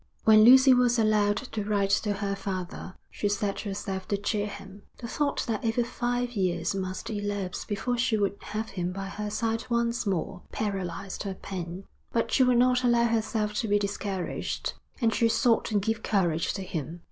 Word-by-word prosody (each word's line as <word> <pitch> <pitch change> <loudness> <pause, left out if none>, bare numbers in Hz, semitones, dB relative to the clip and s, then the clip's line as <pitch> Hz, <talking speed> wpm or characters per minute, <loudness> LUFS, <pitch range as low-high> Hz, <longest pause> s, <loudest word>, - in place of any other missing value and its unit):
When 215 -1 +7
Lucy 260 +3 +8
was 245 -1 +3
allowed 210 -2 +3
to 225 -5 -4
write 200 -1 +1
to 205 +1 +2
her 200 0 -2
father, 185 -1 -5 0.2
she 205 - -1
set 200 0 -1
herself 195 -2 -4
to 200 - 0
cheer 205 +1 -1
him. 200 0 -10 0.2
The 235 - -7
thought 285 +4 -1
that 225 -4 -2
over 230 +1 +1
five 245 +1 -2
years 180 -5 0
must 190 +3 -4
elapse 205 -3 -3
before 235 +4 -2
she 240 -3 +2
would 200 -1 0
have 215 +1 -4
him 180 -1 -3
by 195 +1 -5
her 210 +1 -4
side 225 +1 -1
once 235 -1 0
more, 185 0 -2
paralysed 195 -3 -3
her 195 -2 -4
pen; 185 -1 -6 0.3
but 230 - 0
she - - +3
would 250 -1 +5
not 250 +1 +4
allow 240 -1 +4
herself 220 -2 0
to 225 - -1
be 205 0 +3
discouraged. 200 -2 -3 0.3
And 230 -3 +2
she 230 - +3
sought 225 +1 +3
to 215 - 0
give 225 +2 -1
courage 175 -7 +1
to 195 - -4
him. 170 -2 -5
205 Hz, 185 wpm, -28 LUFS, 195-230 Hz, 0.3 s, Lucy